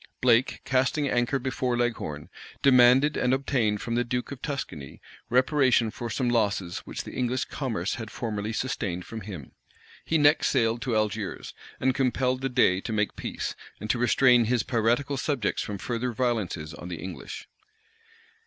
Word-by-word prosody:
Blake, 125 0 +3
casting 130 +3 +1
anchor 120 +1 +1
before 130 -1 -1
Leghorn, 115 -12 -2 0.4
demanded 130 +2 +6
and 125 +1 +2
obtained 120 -6 0
from 115 - -3
the 120 +1 +2
duke 125 +2 -3
of 135 -2 -7
Tuscany 130 - -5 0.3
reparation 130 -2 +3
for 120 +1 -6
some 125 +2 -1
losses 100 -7 0
which - - -5
the - - -8
English 125 0 -1
commerce 110 -10 -3
had 110 - -6
formerly 110 -2 -3
sustained 105 -7 -3
from 115 -1 -7
him. 95 -10 -8 0.5
He 160 - +1
next 150 0 +4
sailed 115 -3 +1
to 125 -4 -1
Algiers, 105 -1 -2 0.3
and 130 0 +2
compelled 130 -1 0
the 135 - -1
dey 110 -7 +3
to 115 - -5
make 105 -1 0
peace, - - -4 0.2
and 110 - -1
to 120 - -1
restrain 125 0 +5
his 120 0 +1
piratical 120 +4 +1
subjects 135 -6 -1
from 105 - -4
further 120 +5 -2
violences 105 -10 -2
on 90 - -9
the 90 -2 -5
English. 95 +4 -7
120 Hz, 160 wpm, -27 LUFS, 105-130 Hz, 0.5 s, demanded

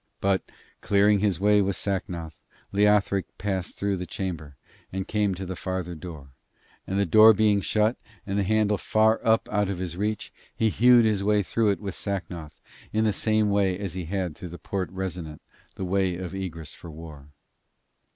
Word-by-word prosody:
But 95 -1 +2 0.4
clearing 100 0 +4
his 100 -4 +1
way 105 +1 +4
with 100 -1 0
Sacnoth, 90 -5 -3 0.4
Leothric 100 -1 +3
passed 95 -3 -3
through 100 -1 -1
the 90 0 -5
chamber, 80 -7 -5 0.4
and 95 0 -4
came 105 -3 0
to 95 +2 -6
the 95 0 -5
farther 95 -1 -4
door; 80 -5 -9 0.6
and 95 - -2
the 100 - +3
door 110 +6 +8
being 105 -2 +3
shut, 110 +4 +1 0.3
and 100 0 -1
the - - +2
handle 105 0 +2
far 110 +1 +2
up 110 -1 +3
out 105 -2 +1
of 100 - -2
his 90 -1 -4
reach, 105 +3 -3 0.2
he 110 - +2
hewed 120 +2 +5
his 105 -3 +1
way 105 0 +3
through 110 +2 +1
it 100 - 0
with 100 -3 -5
Sacnoth 90 -6 -5 0.3
in 110 +1 +1
the 110 -2 +2
same 110 +1 +2
way 100 -2 +2
as 100 -2 -4
he 90 -2 -4
had 90 -2 -3
through 90 - -8
the 85 - -8
Porte 95 +3 -3
Resonant, 90 -5 -5 0.4
the 95 - -4
Way 95 -1 +1
of 90 0 -6
Egress 85 -5 -5
for 85 - -11
War. 75 -3 -11
95 Hz, 185 wpm, -26 LUFS, 90-105 Hz, 0.6 s, door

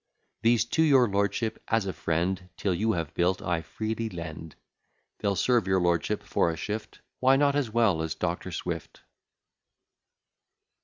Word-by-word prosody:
These, 115 -1 +3
to 160 - 0
your 135 -6 +5
lordship, 100 +2 -1
as 115 -2 +1
a 95 - -3
friend, 90 +4 -1
'Till 95 - 0
you 110 +5 +1
have 85 -3 -3
built, 90 +2 +1
I 85 -2 -1
freely 110 +5 -3
lend: 80 -3 -7 0.6
They'll 100 -1 0
serve 120 +2 +2
your 95 0 +3
lordship 85 -1 0
for - - +1
a 80 - -3
shift; 105 +5 -5 0.2
Why 130 +1 +5
not 140 0 +3
as 145 -5 0
well 110 -7 +2
as 80 -2 -3
Doctor - - -3
Swift? - - -5
100 Hz, 155 wpm, -28 LUFS, 85-115 Hz, 0.6 s, your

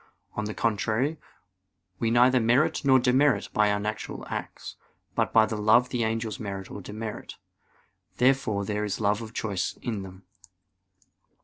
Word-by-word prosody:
On 110 - -3
the 105 - -5
contrary, 115 +7 0 0.8
We 115 - +1
neither 125 +2 +5
merit 120 +5 +2
nor 135 -2 +6
demerit 130 -2 +2
by 105 -1 +3
our 100 - 0
natural 105 +1 -5
acts. - - -6 0.4
But - - 0
by 110 -1 +6
their 110 -1 -4
love 115 +4 +4
the 120 -2 -1
angels 110 -1 -2
merit 100 -3 -6
or 100 - -7
demerit. 105 +3 -7 0.8
Therefore 125 -6 +2
there 105 +1 -2
is 105 -1 -3
love 105 +1 +1
of 110 -1 -8
choice 100 -6 -3
in 110 -5 -3
them. 95 0 -11
110 Hz, 150 wpm, -27 LUFS, 105-120 Hz, 0.8 s, nor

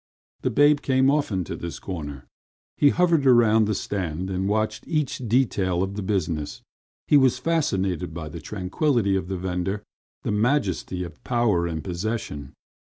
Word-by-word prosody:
The - - 0
babe 145 0 +4
came 130 0 +3
often 125 -11 0
to - - -5
this 85 -1 -6
corner. 75 -7 -6 0.5
He 145 - +5
hovered 170 -2 +3
about 115 -3 +5
the 105 - 0
stand 95 -2 -3
and 95 +1 -1
watched 110 +1 -1
each 150 -5 -1
detail 95 -7 +2
of 95 +1 -3
the 105 - -4
business. 85 -7 -2 0.4
He 145 - +6
was 130 -2 +4
fascinated 100 - 0
by 80 -1 -6
the 80 +1 -8
tranquility 100 - 0
of 95 -2 -2
the 95 0 -3
vendor, 95 +3 -2 0.4
the - - -1
majesty 105 - 0
of 85 -4 -10
power 110 -8 +1
and 80 -2 -4
possession. 85 - -4
100 Hz, 160 wpm, -24 LUFS, 90-125 Hz, 0.5 s, He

